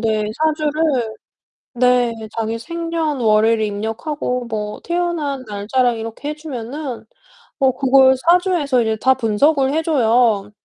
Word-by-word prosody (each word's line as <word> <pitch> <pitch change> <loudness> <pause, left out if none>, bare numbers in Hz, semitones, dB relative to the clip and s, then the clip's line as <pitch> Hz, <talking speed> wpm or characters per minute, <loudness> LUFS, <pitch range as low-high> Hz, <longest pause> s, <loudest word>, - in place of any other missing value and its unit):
네. 215 -2 0 0.2
사주를 300 -6 0 0.6
네, 250 -1 +3 0.3
자기 225 0 -2
생년월일을 275 -9 0
입력하고 225 +5 -3
뭐 210 -2 -5
태어난 340 -6 -2
날짜랑 230 +4 0
이렇게 225 +6 -6
해 300 - -4
주면은 275 -3 -6 0.5
뭐 265 -2 +3
그걸 265 -1 +5
사주에서 335 -4 +2
이제 220 -1 -1
다 265 0 +4
분석을 265 +4 +2
해줘요. 235 -9 +2
255 Hz, 260 characters per minute, -19 LUFS, 225-300 Hz, 0.6 s, 그걸